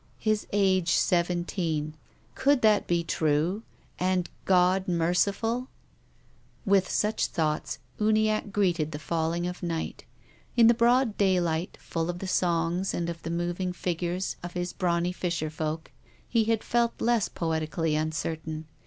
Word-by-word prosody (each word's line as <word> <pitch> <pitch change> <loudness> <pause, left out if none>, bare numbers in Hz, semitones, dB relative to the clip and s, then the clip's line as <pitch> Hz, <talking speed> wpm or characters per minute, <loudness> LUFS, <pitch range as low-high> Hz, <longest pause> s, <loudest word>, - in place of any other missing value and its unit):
"His 215 -1 0
age 190 -4 +3
seven 175 0 +2
teen." 155 -5 -2 0.4
Could 280 -3 +2
that 215 -2 +4
be 170 -1 +1
true 160 +5 0 0.4
and 180 -1 0
God 185 +1 +3
merciful? 200 +8 +1 1.0
With 195 -2 +3
such 215 +1 +1
thoughts, 155 -2 -1 0.2
Uniacke 215 -1 +2
greeted 175 -6 +1
the - - -3
falling 165 +2 -1
of 180 0 -5
night. 165 -2 -4 0.5
In 235 - +7
the 235 - +7
broad 240 -1 +3
daylight, 180 -3 +1
full 165 0 -3
of 175 - -2
the 190 - -6
songs 175 +1 +1
and 170 0 -1
of 170 -1 -9
the 165 - -5
moving 175 +2 -2
figures 180 +1 -2
of 175 0 -7
his 175 0 -3
brawny 175 -1 0
fisher 170 -4 -2
folk, 155 0 -4 0.4
he 230 -2 +2
had 225 -1 +1
felt 235 -1 +1
less 235 -2 +2
poetically 160 -1 -1
uncertain. 155 0 -3
175 Hz, 140 wpm, -27 LUFS, 165-200 Hz, 1.0 s, In